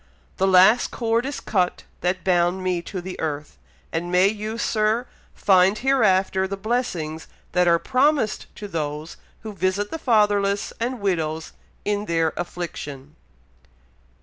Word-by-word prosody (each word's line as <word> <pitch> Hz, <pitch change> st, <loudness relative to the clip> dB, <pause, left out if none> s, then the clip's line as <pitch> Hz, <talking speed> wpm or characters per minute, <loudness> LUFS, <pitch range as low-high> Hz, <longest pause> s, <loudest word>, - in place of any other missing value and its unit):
"The 190 Hz, -, +2 dB
last 190 Hz, +5 st, +6 dB
cord 230 Hz, +2 st, 0 dB
is 285 Hz, -, -4 dB
cut 185 Hz, -4 st, 0 dB, 0.2 s
that 180 Hz, +1 st, -1 dB
bound 180 Hz, 0 st, +2 dB
me 180 Hz, -2 st, 0 dB
to 185 Hz, +1 st, -6 dB
the 185 Hz, +1 st, -7 dB
earth; 150 Hz, -2 st, -4 dB, 0.3 s
and 170 Hz, +2 st, -3 dB
may 180 Hz, +2 st, +5 dB
you, 215 Hz, +1 st, -4 dB
Sir, 220 Hz, +1 st, +1 dB, 0.3 s
find 190 Hz, +1 st, +4 dB
hereafter 195 Hz, -8 st, +2 dB
the 195 Hz, +1 st, -4 dB
blessings 185 Hz, -8 st, -2 dB, 0.2 s
that 180 Hz, 0 st, +2 dB
are 170 Hz, 0 st, +5 dB
promised 260 Hz, -, +1 dB
to 205 Hz, -, -7 dB
those 155 Hz, -2 st, -4 dB, 0.3 s
who 215 Hz, -1 st, -6 dB
visit 190 Hz, +2 st, -1 dB
the 325 Hz, -, -4 dB
fatherless 205 Hz, -6 st, +2 dB
and 245 Hz, +2 st, -2 dB
widows 160 Hz, -5 st, -1 dB, 0.3 s
in 205 Hz, 0 st, -1 dB
their 165 Hz, -3 st, +1 dB
affliction." 150 Hz, -5 st, -6 dB
190 Hz, 140 wpm, -23 LUFS, 175-215 Hz, 0.3 s, last